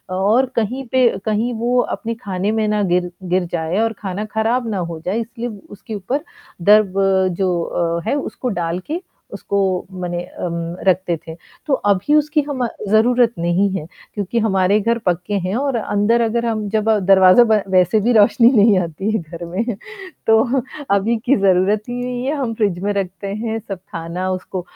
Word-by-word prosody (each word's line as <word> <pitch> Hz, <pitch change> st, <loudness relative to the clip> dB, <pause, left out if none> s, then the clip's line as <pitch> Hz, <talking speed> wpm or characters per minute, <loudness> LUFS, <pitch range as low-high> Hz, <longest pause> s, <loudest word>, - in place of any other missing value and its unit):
और 215 Hz, +8 st, +3 dB
कहीं 250 Hz, +5 st, -1 dB
पे 255 Hz, -2 st, +4 dB, 0.2 s
कहीं 220 Hz, +3 st, 0 dB
वो 245 Hz, +1 st, +1 dB
अपने 230 Hz, -1 st, -4 dB
खाने 195 Hz, +1 st, -1 dB
में 220 Hz, -1 st, 0 dB
ना 210 Hz, 0 st, +1 dB
गिर 180 Hz, 0 st, 0 dB
गिर 180 Hz, 0 st, 0 dB
जाएँ 165 Hz, +4 st, -1 dB
और 225 Hz, 0 st, 0 dB
खाना 200 Hz, +1 st, -4 dB
खराब 230 Hz, +2 st, +1 dB
ना 205 Hz, -, -2 dB
हो 170 Hz, -3 st, -4 dB
जाए 200 Hz, +6 st, 0 dB
इसलिए 230 Hz, +1 st, -6 dB, 0.2 s
उसके 210 Hz, +2 st, -8 dB
ऊपर 255 Hz, -, -3 dB, 0.4 s
दर्ब 205 Hz, +1 st, +5 dB, 0.5 s
जो 170 Hz, -2 st, 0 dB
है, -, -, +1 dB
उसको 270 Hz, -2 st, -3 dB
डाल 175 Hz, -4 st, -2 dB
के 345 Hz, +3 st, -2 dB, 0.3 s
उसको 200 Hz, -, -3 dB, 0.4 s
मने 175 Hz, -1 st, -3 dB
अ, -, -, -13 dB, 0.6 s
रखते 180 Hz, -1 st, +2 dB
थे। 160 Hz, -, -7 dB, 0.3 s
तो 280 Hz, -, +1 dB, 0.2 s
अभी 200 Hz, +10 st, +2 dB
उसकी 300 Hz, 0 st, +2 dB
हम 255 Hz, -4 st, -1 dB, 0.2 s
ज़रूरत 235 Hz, +2 st, +4 dB
नहीं 175 Hz, +4 st, +2 dB
है 155 Hz, -, -6 dB, 0.3 s
क्योंकि 205 Hz, +3 st, -2 dB
हमारे 200 Hz, -1 st, +2 dB
घर 230 Hz, +2 st, +1 dB
पक्के 180 Hz, +3 st, -1 dB
हैं 190 Hz, -, -1 dB
और 275 Hz, 0 st, 0 dB
अंदर 215 Hz, +2 st, +1 dB
अगर 235 Hz, +1 st, 0 dB
हम 215 Hz, -2 st, -1 dB
दरवाज़ा 195 Hz, -1 st, +5 dB
बंद 220 Hz, -3 st, +2 dB
वैसे 185 Hz, +3 st, +4 dB
भी 240 Hz, +3 st, +2 dB
रोशनी 230 Hz, +3 st, +5 dB
नहीं 210 Hz, -2 st, +5 dB
आती 175 Hz, +5 st, -3 dB
है 220 Hz, -, 0 dB
घर 170 Hz, +1 st, -9 dB
में, 185 Hz, +7 st, -2 dB, 0.6 s
तो 235 Hz, +4 st, +3 dB, 0.3 s
अभी 225 Hz, +4 st, +1 dB
की 275 Hz, -, +4 dB
ज़रूरत 195 Hz, +2 st, +3 dB
ही 245 Hz, -, -3 dB
नहीं 250 Hz, 0 st, -4 dB
है। 280 Hz, -, 0 dB
हम 245 Hz, -5 st, -2 dB
फ्रिज 200 Hz, -6 st, 0 dB
में 205 Hz, -, 0 dB
रखते 195 Hz, 0 st, -4 dB
हैं 220 Hz, +3 st, -3 dB
सब 195 Hz, -3 st, -7 dB
खाना 175 Hz, +3 st, -4 dB
उसको 185 Hz, 0 st, -4 dB
210 Hz, 175 wpm, -19 LUFS, 185-235 Hz, 0.6 s, दर्ब